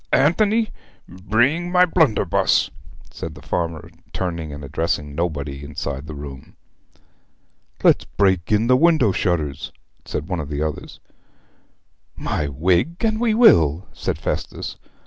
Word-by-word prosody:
Anthony, 215 +8 +3 0.4
bring 120 - 0
my 180 0 +6
blunderbuss,' 145 - +2 0.4
said - - -7
the - - -12
farmer, 85 -3 -3 0.2
turning 85 -4 -3
and 70 0 -8
addressing 75 0 -2
nobody 70 -4 -3
inside 70 -1 -5
the 75 - -7
room. 70 -2 -9 1.3
'Let's - - +4
break 95 -3 +1
in 105 +1 +3
the 125 +2 +5
window 155 - +4
shutters,' 80 -6 -1 0.3
said 75 - -4
one 90 -3 -2
of 75 -2 -5
the 75 0 -2
others. 75 -1 -5 1.2
'My 75 - -2
wig, 85 - +1
and 220 0 0
we 225 -3 +2
will!' 85 - +5
said - - -3
Festus. - - -4
85 Hz, 125 wpm, -21 LUFS, -, 1.3 s, my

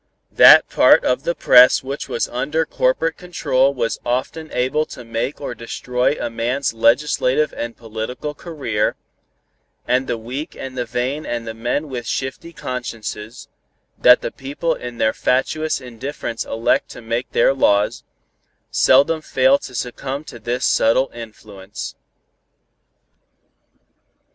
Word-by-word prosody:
That - - +8
part - - +5
of 125 +3 0
the 170 - 0
press 125 +1 +6
which 135 +2 -5
was - - -1
under 150 +6 -1
corporate 160 +4 0
control 140 -7 +1
was 120 -4 -2
often 130 +6 -3
able 130 +5 0
to 125 - -10
make 115 +4 -3
or 145 - -5
destroy 125 +3 -1
a - - -2
man's 120 +3 -2
legislative 130 +4 +2
and 115 0 -5
political 115 +6 -5
career, 140 -10 -2 0.9
and 130 +1 +1
the 120 - -1
weak 125 +7 -6
and 130 -1 -7
the 125 -1 -2
vain 130 +6 -2
and 120 -1 -4
the 110 - -4
men 120 +7 -2
with 120 -4 -6
shifty 130 +5 -4
consciences, 115 -5 -6 0.5
that 125 0 +6
the - - -4
people 145 +5 -3
in 120 -4 -8
their 110 -1 +2
fatuous 155 +5 0
indifference 125 -1 -6
elect 115 +1 0
to - - -10
make 115 +2 -3
their 120 - +3
laws, 105 -3 +2 0.7
seldom 145 +5 +4
fail 135 -1 +3
to 130 - -10
succumb 130 +3 -4
to 120 - -11
this 120 +3 -2
subtle 130 +4 +2
influence. 105 -3 -9
125 Hz, 135 wpm, -20 LUFS, 115-140 Hz, 0.9 s, That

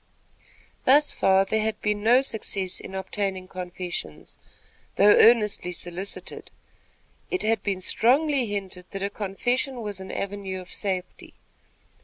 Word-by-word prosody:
Thus 290 +3 +5
far 190 0 +3
there 220 +2 0
had 215 0 -2
been 210 -1 -1
no 245 +5 +5
success 195 -6 -2
in 190 - -9
obtaining 190 -1 -3
confessions, 180 - -7 0.6
though 205 +1 +7
earnestly 210 -6 +4
solicited. 180 +3 -5 0.8
It 370 - -2
had 220 -1 +1
been 195 -2 -2
strongly 270 - +3
hinted 195 -3 -5
that 195 -1 -5
a 200 - -2
confession 245 +6 -2
was 205 -2 -5
an 190 - -7
avenue 195 -1 -4
of 180 - -11
safety. 185 -3 -4
200 Hz, 130 wpm, -25 LUFS, 190-220 Hz, 0.8 s, though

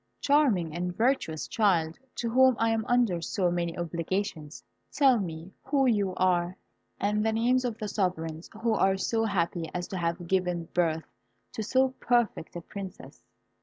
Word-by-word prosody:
Charming 240 - +2
and 180 0 -3
virtuous 225 - 0
child, 170 -6 +1 0.2
to 235 - -2
whom 260 +1 +5
I 225 0 +2
am 225 -1 0
under 235 -8 +2
so 180 +1 0
many 170 -1 -2
obligations, 170 -1 -3 0.3
tell 265 -5 +4
me 170 0 -6
who 275 -2 +2
you 205 -6 +1
are, 180 -1 +1 0.4
and 210 +1 +1
the 220 - +2
names 245 +3 +2
of 235 -3 -2
the 215 - -4
sovereigns 165 -5 -2
who 230 -1 +3
are 195 -2 +2
so 225 +3 0
happy 170 -5 -1
as 175 0 -3
to 190 - -4
have 170 0 -2
given 180 -2 0
birth 160 -2 +1 0.5
to - - -4
so 260 +5 +2
perfect 240 -9 0
a 175 - -4
Princess?" 195 +2 -9
190 Hz, 165 wpm, -28 LUFS, 170-225 Hz, 0.5 s, whom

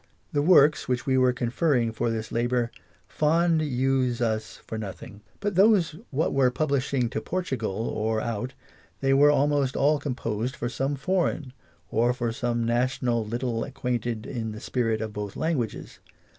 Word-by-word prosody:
The 145 - +1
Works 150 -2 +5
which 125 0 -1
we 130 - +2
were 130 -1 +4
confering 125 0 +1
for 115 +2 -1
this 110 -1 -3
labour^ 120 0 0 0.4
fond 165 +1 +2
use 130 -3 +1
us 110 -2 -1
for - - -6
nothing; 100 0 -8 0.2
but 205 0 -1
those 190 -4 +4
what 150 +3 0
were 135 -2 +4
publishing 135 -2 0
to - - -2
Portugal^ 115 - -2
or 110 +1 0
out, 115 +3 -3 0.5
they 135 0 +3
were 145 +2 +6
almost 145 -2 +2
all 145 +2 +3
composed 125 -3 -3
for 120 - -3
some 135 +3 -1
foreign, 150 -3 -1 0.4
or 120 +2 +2
for 120 -2 -2
some 120 0 -1
national 120 0 +1
little 120 0 -2
acquainted 120 -3 -3
in 115 -4 -4
the 110 - -8
spirit 115 -3 -1
of 110 -1 -4
both 105 -1 -5
languages. 150 -9 -2
125 Hz, 155 wpm, -26 LUFS, 115-145 Hz, 0.5 s, were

